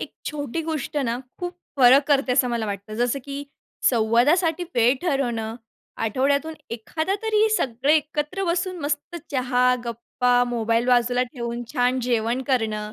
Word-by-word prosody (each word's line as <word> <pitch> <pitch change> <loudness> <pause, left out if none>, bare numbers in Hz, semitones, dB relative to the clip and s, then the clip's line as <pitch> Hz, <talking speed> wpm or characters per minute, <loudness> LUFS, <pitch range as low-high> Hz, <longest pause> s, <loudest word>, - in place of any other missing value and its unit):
एक - - -6 0.2
छोटी 295 +1 -4
गोष्ट 310 -2 -4
ना, 235 0 -1 0.2
खूप 355 0 -4 0.2
फरक 270 +2 +6
करते 275 -3 +3
असं 250 -1 +3
मला 235 -2 -1
वाटतं, 200 +1 -5
जसं 245 +4 0
की 280 0 -6 0.5
संवादासाठी 290 +10 +2
वेळ 240 +2 +4
ठरवणं, 240 -9 -1 0.5
आठवड्यातून 280 +7 0 0.2
एखादा 315 - -2
तरी 440 0 +3
सगळे 260 +4 +1
एकत्र 300 +5 -2
बसून 360 +1 -1
मस्त 295 +3 -3
चहा, 250 -2 +2
गप्पा, 245 +1 +1
मोबाईल 230 0 0
बाजूला 245 0 +3
ठेवून 235 -2 -4
छान 250 +1 +2
जेवण 235 +1 0
करणं. 220 -5 -1
250 Hz, 140 wpm, -23 LUFS, 235-295 Hz, 0.5 s, फरक